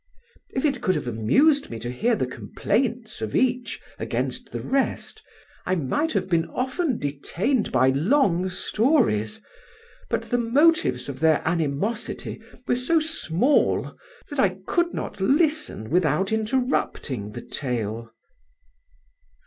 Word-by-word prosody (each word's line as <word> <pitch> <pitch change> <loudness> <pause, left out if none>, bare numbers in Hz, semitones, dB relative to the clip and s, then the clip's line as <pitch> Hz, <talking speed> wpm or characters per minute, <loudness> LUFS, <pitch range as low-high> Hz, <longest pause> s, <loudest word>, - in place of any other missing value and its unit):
If 265 - -2
it 270 -4 0
could 185 -5 +2
have - - -3
amused 140 - +3
me 115 - -5
to 120 +2 -5
hear 230 - +1
the 165 - 0
complaints 225 - -2
of 110 -1 -3
each 250 -1 +1 0.2
against - - -3
the - - -4
rest, 270 0 -1 0.4
I 185 - 0
might 185 - 0
have 190 -3 0
been 170 -3 +2
often 260 +1 -1
detained 170 - -1
by 130 - +4
long 185 - +2
stories; 195 - +1 0.7
but - - 0
the 245 - +2
motives 235 - +3
of 135 -2 -6
their 160 -1 +3
animosity 175 - -2 0.3
were - - +3
so 265 +7 +2
small 295 - +1 0.4
that 290 - -4
I 190 -5 +2
could 345 0 +1
not - - -5
listen 295 - +1
without 180 +3 +2
interrupting 220 - -1
the - - -6
tale." 115 -4 -3
205 Hz, 130 wpm, -24 LUFS, -, 0.7 s, by